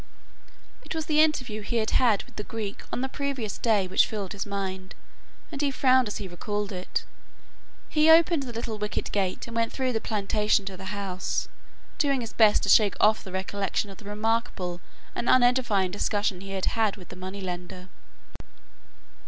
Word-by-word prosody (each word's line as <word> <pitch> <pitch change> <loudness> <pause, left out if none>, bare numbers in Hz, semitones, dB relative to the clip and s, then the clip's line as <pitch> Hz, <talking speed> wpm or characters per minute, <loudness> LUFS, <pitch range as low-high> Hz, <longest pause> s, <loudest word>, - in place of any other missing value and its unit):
It - - -6
was 320 -1 -2
the 305 -1 +4
interview 255 -9 +1
he 210 - -4
had 220 -2 +1
had 225 -6 +3
with - - -20
the 210 - -4
Greek 210 -2 -5
on - - -2
the 265 - 0
previous 265 -6 -3
day 215 -5 +2
which 185 - +3
filled 205 -4 -4
his 205 +1 -4
mind, 190 -2 -4 0.6
and 285 -2 -4
he 290 - +2
frowned 260 -2 +4
as 210 - -4
he 195 - -5
recalled 205 +3 -3
it. 180 -1 -3 0.8
He 310 0 +3
opened 330 -1 +6
the 260 -3 -5
little 225 -2 -4
wicket 210 0 -3
gate 190 -3 -1
and 235 - -8
went 230 0 +1
through 260 -2 -1
the 225 - -1
plantation 210 -1 +1
to 195 -1 -5
the 190 +1 -9
house, 190 -2 -3 0.5
doing 275 -3 +2
his 230 - -6
best 215 -2 +5
to - - -1
shake 205 0 +6
off 215 +1 +4
the 190 - -9
recollection 195 +2 -2
of 195 - -13
the 215 - -13
remarkable 210 -4 -1 0.3
and 240 - -2
unedifying 245 -7 +3
discussion 205 -1 -1
he 195 - -9
had 190 -1 -1
had 220 -3 +1
with 180 - -13
the - - -9
moneylender. 185 -1 -6
210 Hz, 185 wpm, -27 LUFS, 195-240 Hz, 0.8 s, opened